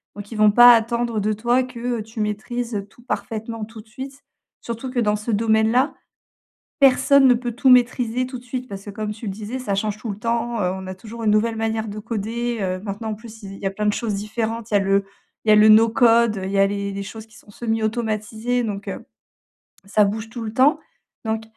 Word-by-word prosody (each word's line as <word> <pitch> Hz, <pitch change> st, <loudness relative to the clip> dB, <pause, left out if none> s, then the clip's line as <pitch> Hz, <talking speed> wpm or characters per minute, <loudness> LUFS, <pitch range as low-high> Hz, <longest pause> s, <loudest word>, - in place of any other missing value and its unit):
Donc 205 Hz, +1 st, -9 dB
ils 225 Hz, -, -6 dB
vont 215 Hz, -1 st, +5 dB
pas 240 Hz, +3 st, +9 dB
attendre 235 Hz, 0 st, 0 dB
de 210 Hz, +1 st, 0 dB
toi 240 Hz, +4 st, +1 dB
que, 245 Hz, -1 st, -4 dB
heu, -, -, -4 dB
tu 220 Hz, +1 st, -6 dB
maîtrises, 220 Hz, +3 st, -3 dB
heu, 200 Hz, -1 st, -3 dB
tout 235 Hz, +4 st, -21 dB
parfaitement, 225 Hz, -2 st, -4 dB
tout 220 Hz, 0 st, -12 dB
de 215 Hz, -, -23 dB
suite. 265 Hz, +5 st, -9 dB, 0.4 s
Surtout 235 Hz, +2 st, -5 dB
que 250 Hz, -1 st, -2 dB
dans 210 Hz, -3 st, +2 dB
ce 210 Hz, +3 st, -7 dB
domaine-là, 220 Hz, +5 st, +2 dB, 0.9 s
personne 275 Hz, +1 st, +5 dB
ne 250 Hz, -, +6 dB
peut 240 Hz, 0 st, -3 dB
tout 255 Hz, +3 st, +2 dB
maîtriser, 250 Hz, 0 st, +3 dB
tout 255 Hz, 0 st, -7 dB
de 240 Hz, -, -15 dB
suite. 250 Hz, +1 st, -5 dB
Parce 195 Hz, -2 st, -8 dB
que, 205 Hz, -, -7 dB
comme 210 Hz, +1 st, -4 dB
tu 210 Hz, +2 st, -11 dB
le 195 Hz, -, -2 dB
disais, 215 Hz, +5 st, -6 dB
ça 245 Hz, -6 st, -2 dB
change 205 Hz, +1 st, -1 dB
tout 220 Hz, 0 st, -5 dB
le 200 Hz, -, -6 dB
temps, 235 Hz, 0 st, -1 dB
heu, 180 Hz, -2 st, +1 dB
on 190 Hz, 0 st, -7 dB
a 185 Hz, -, -5 dB
toujours 225 Hz, +4 st, -9 dB
une 215 Hz, -, +3 dB
nouvelle 225 Hz, +2 st, +1 dB
manière 220 Hz, 0 st, -2 dB
de 205 Hz, +1 st, -6 dB
coder, 230 Hz, +2 st, -3 dB
heu. 185 Hz, -1 st, -1 dB
Maintenant, 205 Hz, +2 st, -5 dB
en -, -, -2 dB
plus, 220 Hz, +1 st, -13 dB
il 195 Hz, -1 st, -8 dB
il -, -, -11 dB
y 195 Hz, -, -4 dB
a -, -, +1 dB
plein 210 Hz, +2 st, -3 dB
de 210 Hz, -, +3 dB
choses 225 Hz, -4 st, -2 dB
différentes, 220 Hz, +2 st, -3 dB
il -, -, -2 dB
y -, -, +7 dB
a -, -, +4 dB
le 195 Hz, 0 st, +2 dB, 0.4 s
il -, -, -3 dB
y -, -, +8 dB
a -, -, +7 dB
le 210 Hz, +1 st, +7 dB
no 220 Hz, +1 st, +7 dB
code, 230 Hz, -2 st, +4 dB
il 190 Hz, -, -3 dB
y 200 Hz, -, 0 dB
a 195 Hz, -, +5 dB
les 200 Hz, 0 st, -3 dB
les 200 Hz, 0 st, -4 dB
choses 220 Hz, +2 st, -8 dB
qui 220 Hz, -, -20 dB
sont -, -, -18 dB
semi 225 Hz, +1 st, -2 dB
automatisées, 220 Hz, +2 st, -1 dB
donc, 205 Hz, -3 st, -4 dB
heu, -, -, -6 dB, 0.8 s
ça 205 Hz, +1 st, +3 dB
bouge 220 Hz, +2 st, -3 dB
tout 235 Hz, +1 st, -7 dB
le 215 Hz, -1 st, -5 dB
temps. 265 Hz, +6 st, +4 dB, 0.5 s
Donc, 220 Hz, 0 st, -1 dB
220 Hz, 250 wpm, -22 LUFS, 210-240 Hz, 0.9 s, pas